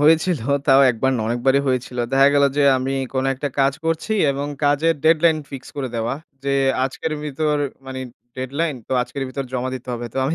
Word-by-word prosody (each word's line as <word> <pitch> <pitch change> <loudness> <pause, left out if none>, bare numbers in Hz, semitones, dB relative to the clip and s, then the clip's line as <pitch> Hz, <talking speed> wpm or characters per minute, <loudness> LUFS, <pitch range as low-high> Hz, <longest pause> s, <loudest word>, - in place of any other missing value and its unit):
হয়েছিল, 160 +2 +4 0.3
তাও 135 -1 +6
একবার 125 +3 0
নয় 110 - -1
অনেকবারই 130 +4 +2
হয়েছিল। 125 -1 -2
দেখা 135 +1 +6
গেলো 140 0 +5
যে, 145 - +3 0.2
আমি 130 +1 -2 0.2
কোন 130 0 0
একটা 140 +2 -3
কাজ 135 0 +3
করছি 165 +6 -1 0.2
এবং 140 +1 -3 0.2
কাজের 145 +3 +3
deadline 160 0 +4
fix 135 -2 -7
করে 135 -2 -2
দেওয়া। 115 +1 -1 0.3
যে 140 - 0 0.3
আজকের 145 +4 -3
ভিতর 150 +1 0 0.3
মানে 130 0 -5 0.4
deadline 140 +4 -2
তো - - -3
আজকের 135 +2 -5
ভিতর 135 +1 -4
জমা 130 0 -2
দিতে 130 0 -9
হবে। 120 0 -4
তো - - -2
আমি 155 - 0
135 Hz, 190 wpm, -21 LUFS, 130-150 Hz, 0.4 s, তাও